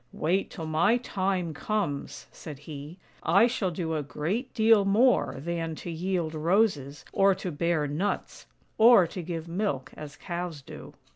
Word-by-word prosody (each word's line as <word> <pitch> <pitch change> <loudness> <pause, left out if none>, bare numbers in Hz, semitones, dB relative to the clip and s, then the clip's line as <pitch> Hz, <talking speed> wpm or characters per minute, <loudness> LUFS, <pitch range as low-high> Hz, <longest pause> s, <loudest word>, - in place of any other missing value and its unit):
" - - -40 0.2
Wait 190 +4 +1
till 165 - -7
my 160 +9 +3
time 190 -7 -2
comes," 175 -4 -3
said 150 -4 -9
he; 150 +3 -9 0.2
"I 195 +7 +5
shall 230 -6 0
do 165 -1 -3
a 155 - -1
great 160 - -3
deal 220 -2 +5
more 220 +6 +3
than 165 +2 -3
to 170 - -7
yield 170 -1 -2
roses, 155 -4 0
or 195 0 +4
to 185 - -5
bear 165 0 0
nuts, 155 +8 -3 0.3
or 225 -4 +8
to 180 +2 -6
give 165 -1 -5
milk 165 -7 -2
as 145 -1 -9
cows 170 -4 -5
do." - - -11
170 Hz, 160 wpm, -27 LUFS, 155-195 Hz, 0.3 s, or